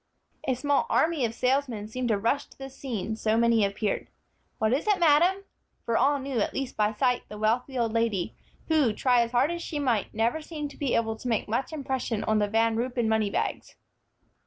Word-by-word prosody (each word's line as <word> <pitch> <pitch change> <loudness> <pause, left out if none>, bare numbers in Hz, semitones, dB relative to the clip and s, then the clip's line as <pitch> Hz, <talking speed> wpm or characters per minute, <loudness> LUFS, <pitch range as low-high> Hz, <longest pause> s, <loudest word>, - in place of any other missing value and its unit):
A 260 - +2
small 285 +3 +1
army 315 -5 +2
of 230 0 -4
salesmen 250 -5 0
seemed 250 +3 -3
to 220 -3 +2
rush 230 +7 0
to - - -20
the 270 0 -8
scene, 225 -6 -4
so 220 0 0
many 230 -2 +4
appeared. 200 +1 -1 0.5
"What 220 +2 +1
is 285 +10 -1
it, 415 -2 +4
madam?" 350 +4 +4 0.4
for 230 - 0
all 280 +4 +3
knew, 270 -3 -3
at - - -1
least 270 -2 -3
by 210 0 +2
sight, 245 +3 +1
the 210 - -8
wealthy 240 +5 0
old 230 -2 0
lady, 230 -6 0 0.3
who, 300 -8 +3
try 245 +1 +3
as 235 - 0
hard 255 +6 +2
as 345 0 -4
she 315 - -4
might, 245 -8 0
never 230 +8 0
seemed 300 -2 -6
to - - -14
be 275 -4 0
able 225 -1 0
to 250 - -7
make 230 -3 0
much 235 +8 -1
impression 265 -7 -2
on 215 0 +2
the 205 - +2
Van 225 +2 +2
Ruypen 240 -1 -1
money 220 -2 +2
bags. - - -3
240 Hz, 210 wpm, -27 LUFS, 220-275 Hz, 0.5 s, many